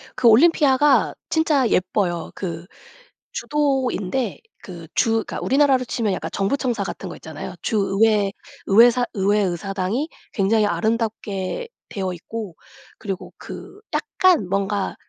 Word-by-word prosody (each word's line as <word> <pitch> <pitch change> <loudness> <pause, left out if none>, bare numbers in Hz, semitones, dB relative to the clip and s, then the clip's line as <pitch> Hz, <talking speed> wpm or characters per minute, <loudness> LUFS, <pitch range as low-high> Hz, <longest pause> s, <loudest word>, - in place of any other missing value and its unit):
그 240 - +3
올림피아가 285 +2 +5
진짜 305 -5 +2
예뻐요. 180 -2 0
그 170 -3 -5 0.7
주도인데 265 -6 -1 0.2
그 170 -3 -9
주 225 - +3
그러니까 225 0 -1
우리나라로 270 -2 +3
치면 230 -3 -1
약간 - - -4
정부 200 +8 0
청사 240 -6 -1
같은 195 - -6
거 - - -7
있잖아요. 160 +3 -8
주 220 - -1 0.2
의회 210 -3 +4 0.4
의회 230 +5 +7
사 245 +1 0
의회 205 +1 +2
의사당이 195 - -2 0.2
굉장히 210 +1 +2
아름답게 220 - -2 0.2
되어 190 -3 -3
있고 195 +1 -7 0.4
그리고 195 -4 -6
그 400 - -10
약간 355 - +2
뭔가 200 +1 -1
215 Hz, 290 characters per minute, -22 LUFS, 195-260 Hz, 0.7 s, 의회